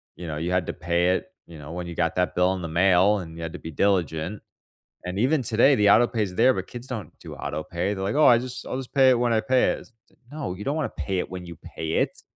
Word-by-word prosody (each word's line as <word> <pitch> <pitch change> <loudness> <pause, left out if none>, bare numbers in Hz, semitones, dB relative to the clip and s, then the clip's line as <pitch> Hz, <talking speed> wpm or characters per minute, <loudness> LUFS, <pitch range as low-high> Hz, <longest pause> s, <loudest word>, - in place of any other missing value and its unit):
You 90 - -8
know, 75 -1 -4
you 85 +3 -2
had 90 -2 0
to - - -3
pay 85 +1 0
it, - - -4 0.2
you 85 - -12
know, 75 +1 -9
when 90 0 -5
you 85 - -7
got 85 -1 0
that 90 0 0
bill 90 +1 +3
in 95 - -5
the 85 - -4
mail, 95 +4 +4
and 80 -3 -8
you 85 - -8
had 80 - -5
to - - -7
be 80 - -8
diligent. 90 +1 0 0.6
And 90 +2 -3
even 130 +3 +2
today, 120 +4 +4
the 105 - +2
autopay's 110 -3 +3
there, 125 +5 +5
but - - -4
kids 120 +1 -9
don't 115 -6 -7
do - - -9
autopay. 85 +6 -3
They're 95 - -5
like, 100 +3 -1
"Oh, 155 - +5
I 120 -2 +7
just 125 0 -6
I'll - - -4
just 130 -2 -8
pay 135 -2 +6
it 125 - +2
when 120 -1 +2
I 110 - +3
pay 130 0 +2
it." - - -9 0.4
No, 145 -12 -4
you 100 - -8
don't 140 - 0
want 160 - -2
to - - -5
pay 95 -2 -1
it - - -3
when 90 -1 -7
you 85 -1 -9
pay 80 0 -5
it, - - 0
95 Hz, 280 wpm, -25 LUFS, 85-120 Hz, 0.6 s, I